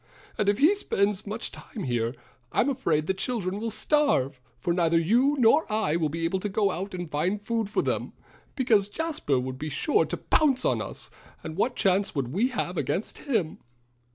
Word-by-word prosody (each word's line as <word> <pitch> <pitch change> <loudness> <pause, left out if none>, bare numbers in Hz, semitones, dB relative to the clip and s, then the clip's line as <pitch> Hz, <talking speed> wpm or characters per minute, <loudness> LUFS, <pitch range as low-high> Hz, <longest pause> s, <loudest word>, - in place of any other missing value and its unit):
"And 205 -1 +1
if 205 - +2
he 310 +8 +5
spends 205 - 0
much 215 +3 -4
time 215 - -8
here 120 -1 -1 0.4
I'm 260 - +2
afraid 170 - 0
the 190 - +1
children 195 -1 -2
will 230 +1 -2
starve, 215 - +1 0.2
for 170 +8 -1
neither 170 -1 +2
you 240 - +3
nor 250 +3 +4
I 215 -7 +1
will 160 -3 +1
be 165 +2 -3
able 185 +3 0
to 205 - -3
go 200 0 +1
out 190 +2 -4
and 175 -1 -4
find 170 +8 -1
food 220 0 -2
for - - 0
them, - - -2 0.4
because 215 -6 +2
Jasper 305 - -1
would 130 +1 -5
be 155 - -4
sure 150 - +2
to - - -4
pounce 285 -5 +2
on - - +2
us; - - -7 0.3
and 160 -1 -6
what 245 +7 0
chance 195 0 +1
would 135 -4 -1
we 200 - +1
have - - -3
against - - -2
him?" 220 - -1
200 Hz, 195 wpm, -27 LUFS, 165-235 Hz, 0.4 s, he